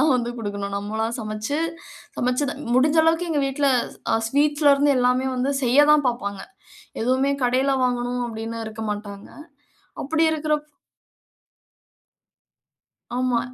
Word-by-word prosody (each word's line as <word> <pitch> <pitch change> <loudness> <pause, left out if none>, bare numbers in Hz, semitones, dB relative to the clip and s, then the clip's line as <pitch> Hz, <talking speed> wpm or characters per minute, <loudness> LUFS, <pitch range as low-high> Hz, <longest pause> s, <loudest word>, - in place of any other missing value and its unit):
தான் 300 -1 +4
வந்து 240 -1 -2
குடுக்கணும். 200 -2 -4
நம்மளா 215 +2 -2
சமைச்சி 215 +6 -3 0.6
சமைச்சது-முடிஞ்ச 270 +2 +1
அளவுக்கு 325 +2 +2
எங்க 295 -2 +1
வீட்ல, 275 +1 0 0.4
அ, - - +3
ஸ்வீட்ஸ்ல 290 +2 +3
இருந்து 285 0 +3
எல்லாமே 250 +1 +2
வந்து 265 +3 0
செய்யத்தான் 290 +3 +5
பாப்பாங்க. 200 -5 -4 0.6
எதுவுமே 260 +3 +2
கடைல 260 +3 +2
வாங்கணும் 245 0 -1
அப்டின்னு 225 0 -5
இருக்க 220 0 -7
மாட்டாங்க. 205 -1 -6 0.8
அப்டி 320 +3 +1
இருக்கிறப்போ 300 -1 -2 2.5
ஆமா. 250 -2 +1
255 Hz, 110 wpm, -23 LUFS, 225-290 Hz, 2.5 s, செய்யத்தான்